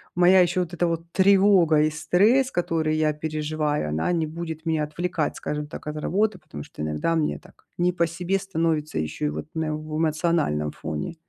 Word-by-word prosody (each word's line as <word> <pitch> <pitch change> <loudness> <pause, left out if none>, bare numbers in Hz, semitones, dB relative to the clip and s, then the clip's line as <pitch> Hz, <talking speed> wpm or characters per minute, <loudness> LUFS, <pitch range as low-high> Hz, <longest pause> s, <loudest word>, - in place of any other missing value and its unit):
моя 180 +1 +6
ещё 175 +1 +1
вот 175 0 -4
эта 175 0 +1
вот 165 0 -3
тревога 190 -5 +5
и 155 - +3
стресс, 205 - +3
которые 165 -3 0
я 155 -1 +2
переживаю, 150 - -2
она 80 - 0
не 160 -2 0
будет 160 0 -6
меня 160 -2 +1
отвлекать, 165 +1 -2
скажем 150 0 -4
так, 150 - -9
от 150 - -4
работы. 200 +6 0
Потому 155 - -9
что - - -11
иногда 75 - -1
мне 155 -2 0
так - - -21
не 175 +1 +2
по 170 -1 +2
себе 180 +3 -1
становится 165 - -1
ещё 75 -1 -3
и - - 0
вот 75 +1 -5
именно 155 -1 -1
в 155 0 -6
эмоциональном 155 - 0
фоне. 75 - -5
160 Hz, 190 wpm, -24 LUFS, 150-175 Hz, -, моя